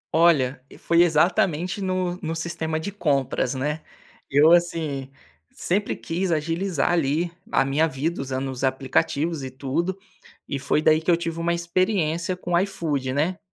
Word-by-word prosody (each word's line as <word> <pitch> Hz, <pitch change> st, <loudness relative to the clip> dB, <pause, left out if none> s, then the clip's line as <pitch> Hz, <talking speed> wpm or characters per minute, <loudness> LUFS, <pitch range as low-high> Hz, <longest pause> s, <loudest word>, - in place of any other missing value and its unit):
Olha, 145 Hz, -6 st, +3 dB, 0.2 s
foi 170 Hz, 0 st, +3 dB
exatamente 175 Hz, +2 st, +2 dB
no 185 Hz, -1 st, -1 dB
no 160 Hz, +1 st, -3 dB
sistema 165 Hz, -1 st, -3 dB
de 180 Hz, +6 st, -4 dB
compras, 140 Hz, -8 st, 0 dB
né, 150 Hz, +4 st, -2 dB, 0.5 s
eu 145 Hz, +4 st, +5 dB
assim, 160 Hz, -6 st, +1 dB, 0.4 s
sempre 200 Hz, +4 st, -1 dB
quis 175 Hz, +2 st, -2 dB
agilizar 165 Hz, +1 st, 0 dB
ali 165 Hz, +1 st, +1 dB, 0.2 s
a 135 Hz, -, +3 dB
minha 145 Hz, +4 st, +2 dB
vida 155 Hz, +2 st, -2 dB
usando 135 Hz, 0 st, -3 dB
os 130 Hz, 0 st, -6 dB
aplicativos 140 Hz, +3 st, 0 dB
e 130 Hz, -, -4 dB
tudo, 140 Hz, +8 st, -2 dB, 0.5 s
e 140 Hz, -, -3 dB
foi 150 Hz, +3 st, 0 dB
daí 155 Hz, 0 st, +4 dB
que 165 Hz, -, -4 dB
eu 170 Hz, -, +5 dB
tive 165 Hz, -1 st, -4 dB
uma 170 Hz, +1 st, 0 dB
experiência 170 Hz, 0 st, 0 dB
com 175 Hz, -, -6 dB
o 170 Hz, -, +5 dB
iFood 150 Hz, -9 st, -2 dB
né, 160 Hz, +7 st, 0 dB
160 Hz, 155 wpm, -24 LUFS, 140-175 Hz, 0.5 s, eu